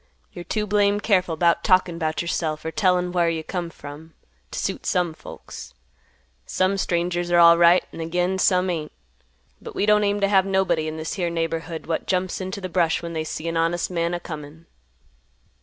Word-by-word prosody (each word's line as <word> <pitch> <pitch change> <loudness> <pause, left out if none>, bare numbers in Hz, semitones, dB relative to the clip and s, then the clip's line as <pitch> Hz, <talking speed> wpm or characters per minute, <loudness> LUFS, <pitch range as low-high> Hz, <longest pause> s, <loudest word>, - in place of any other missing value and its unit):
You're 175 - -7
too 215 -1 -1
blame 205 0 +2
careful 185 -6 +1
'bout 170 0 +2
talkin' 185 -2 +2
'bout 155 0 -1
yourself, 155 -2 -2
or 160 - -2
tellin' 180 -2 +1
whar 175 -2 +2
you 165 -1 -2
come 175 0 -4
from, 155 +1 -11 0.3
t' - - -7
suit - - -3
some 180 -4 +1
folks. - - -11 0.7
Some 190 +1 +1
strangers 175 -1 -1
are 175 0 +4
alright, 170 +1 +7
an' - - -9
again 180 +3 -1
some 185 -1 +3
ain't. 155 -3 -4 0.7
But - - -9
we - - +1
don't 210 0 +4
aim 205 0 +1
t' 200 - +2
have 195 -1 +3
nobody 185 -5 +1
in 155 0 -5
this 160 0 -4
here 175 -3 -1
neighborhood 165 0 -3
what 165 0 -3
jumps 185 0 -1
into 190 +2 -4
th' 185 -3 -7
brush 170 -2 +1
when 170 0 -5
they 160 -1 -2
see 155 +1 -5
an 165 0 -1
honest 165 +2 0
man 170 0 -1
a - - -3
comin'." 155 -1 -9
175 Hz, 190 wpm, -23 LUFS, 165-185 Hz, 0.7 s, alright